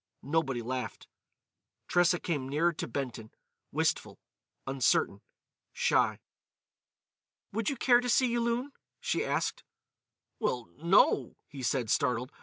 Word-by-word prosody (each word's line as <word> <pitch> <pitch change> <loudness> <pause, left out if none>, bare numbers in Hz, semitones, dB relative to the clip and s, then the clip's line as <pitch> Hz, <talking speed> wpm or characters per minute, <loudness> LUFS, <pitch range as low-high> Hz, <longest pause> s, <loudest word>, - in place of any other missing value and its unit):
Nobody 135 -4 0
laughed. 125 -2 -4 0.8
Tressa 175 0 +3
came 145 -6 -2
nearer 165 +5 +2
to - - -5
Benton, 120 -3 -4 0.4
wistful, - - -1 0.5
uncertain, 125 -6 +1 0.5
shy. - - +2 1.3
"Would 220 +1 0
you 280 - -2
care 245 0 +5
to 245 - -3
see 250 0 +3
Yulun?" 240 +3 0 0.3
she 485 0 0
asked. - - -1 0.8
"Well—no," 155 - +2
he 140 -4 -9
said, 125 -3 0
startled. 125 +2 +1
145 Hz, 105 wpm, -30 LUFS, -, 1.3 s, care